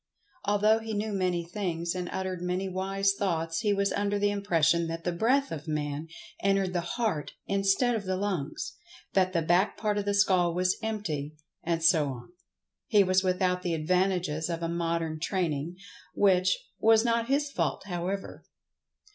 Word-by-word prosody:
Although 210 +2 +3
he 220 -1 -5
knew 210 +1 -2
many 180 -3 0
things, 170 -2 -2
and 180 -1 -4
uttered 185 -2 -3
many 180 +2 -1
wise 195 +1 0
thoughts, 165 -5 -1
he 210 -1 +1
was 200 0 +1
under 205 0 0
the 205 0 +2
impression 170 -4 +2
that 165 0 -5
the 175 - 0
breath 255 +10 +1
of 160 0 -6
Man 150 0 -2 0.3
entered 195 -2 +1
the 175 - 0 0.2
heart 210 -11 -1
instead 195 +5 +2
of 215 -3 -2
the 185 0 -1
lungs—that 190 - -2
the 170 -2 +1
back 175 +5 +2
part 210 -1 0
of 200 - -3
the 205 0 +1
skull 185 -4 +3
was 180 +1 +1
empty, 160 -10 -3 0.3
and 165 -1 -1
so 165 -3 +5
on. 125 +1 -8 0.6
He 205 -2 +5
was 185 0 +3
without 185 -1 +1
the 175 -2 -1
advantages 175 -1 0
of 170 0 -3
a - - 0
modern 165 -1 -1
training—which, 180 +3 0 0.2
was 225 +1 +5
not 230 0 +1
his 285 +2 +1
fault, - - -1
however. 190 +1 -4
185 Hz, 165 wpm, -28 LUFS, 170-205 Hz, 0.6 s, so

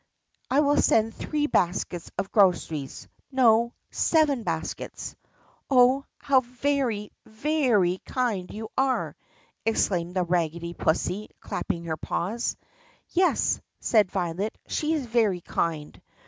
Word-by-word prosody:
I 270 +4 +4
will 290 0 +3
send 225 0 +3
three 295 +5 -1
baskets 175 - 0
of 195 +1 -3
groceries 170 -8 +1
— - - -39
no, 235 -2 +4 0.2
seven 305 -6 +2
baskets." - - -4 0.5
"Oh, 260 +1 +5
how 275 -2 +3
very, 250 -4 -1 0.2
very 220 - +1
kind 220 -8 -1
you 220 +1 -6
are!" 265 -1 0 0.5
exclaimed 180 -5 0
the 185 - +2
raggedy 170 -1 -1
pussy 185 +6 -1
clapping 170 - -3
her 160 -2 -3
paws. 220 +11 -2 0.5
"Yes," 365 +1 +2 0.2
said 210 -5 +3
Violet, 185 +3 -2
"she 310 +1 -1
is 300 -5 -1
very 220 -6 +1
kind." 160 -3 -3
220 Hz, 120 wpm, -26 LUFS, 180-260 Hz, 0.5 s, Oh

